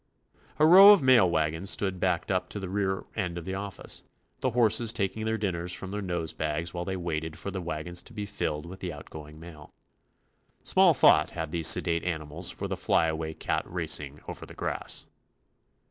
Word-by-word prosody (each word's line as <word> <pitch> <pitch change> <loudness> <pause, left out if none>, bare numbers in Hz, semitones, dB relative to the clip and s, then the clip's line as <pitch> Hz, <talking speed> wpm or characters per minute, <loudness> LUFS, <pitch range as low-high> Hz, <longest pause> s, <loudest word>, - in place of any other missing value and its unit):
A 155 - +4
row 195 +5 +10
of 200 - +2
mail 120 -8 +5
wagons 80 +3 -1
stood 95 -3 0
backed 90 0 -1
up 90 -1 -1
to 105 - -6
the 95 -2 -6
rear 95 -1 -2
end 90 -5 -3
of 85 - -7
the 95 - -4
office, 100 0 -4 0.4
the 130 - 0
horses 115 -1 +3
taking 110 0 -2
their 110 0 -1
dinners 90 -4 -3
from 95 +1 -5
their 105 +1 -4
nose 85 -4 -3
bags 80 +2 -3
while 85 0 -4
they 95 0 -3
waited 80 -3 -4
for 100 - -6
the 95 -1 -5
wagons 85 +1 -3
to - - -13
be 105 -2 -5
filled 75 -7 -3
with 95 +3 -10
the 90 -2 -4
out 75 -2 -11
going 75 0 -10
mail. 80 -3 -13 0.9
Small - - +4
thought 75 - +5
had 80 -2 -5
these 80 -1 +2
sedate 85 -1 +4
animals 80 0 -3
for - - -5
the - - -3
fly - - +2
away 80 0 -4
cat - - -1
racing 75 -4 -1
over - - -8
the - - -11
grass. - - -3
90 Hz, 200 wpm, -27 LUFS, 80-100 Hz, 0.9 s, row